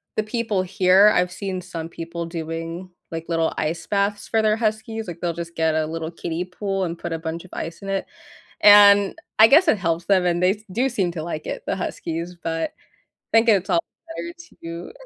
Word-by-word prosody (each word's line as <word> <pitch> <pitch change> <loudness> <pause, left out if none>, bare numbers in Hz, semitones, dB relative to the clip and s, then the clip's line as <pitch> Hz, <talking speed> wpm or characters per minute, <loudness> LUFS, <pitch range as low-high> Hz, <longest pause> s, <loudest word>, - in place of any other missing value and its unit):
the 215 - +1
people 215 -3 -1
here 190 +2 +5
I've 180 0 +1
seen 185 -1 -4
some 165 -2 -7
people 170 0 -6
doing 165 +2 -5 0.2
like 165 0 -5
little 165 -1 0
ice 160 +2 -2
baths 200 0 0
for 225 -1 +2
their 215 0 +3
huskies, 220 0 -2
like, 170 -1 -7
they'll 170 -1 -1
just 170 0 -7
get 160 -1 +1
a 155 -1 +1
little 160 +1 -5
kiddie 170 +1 -4
pool 195 0 -3
and 170 0 -4
put 175 - -6
a 165 - -2
bunch 165 +1 -5
of 185 - -15
ice 165 +1 -5
in 195 - -7
it, 195 0 -1 0.6
and 205 -1 +7 0.2
I 220 - +10
guess 315 +7 +5
it 220 - +4
helps 170 -1 -1
them, 190 -3 +3
and 175 0 +1
they 180 - +5
s 205 +2 -3
do 250 +6 +1
seem 195 -8 -1
to 160 -2 -5
like 160 -2 -5
it, - - -4
the 195 - -1
huskies, 170 -1 -4
but 165 0 -2 0.4
I - - -4
think 230 +1 +2
it's 195 -2 +3
all 170 -1 +3 0.4
better 340 0 -6 0.3
to 170 - -7
180 Hz, 215 wpm, -22 LUFS, 165-205 Hz, 0.6 s, I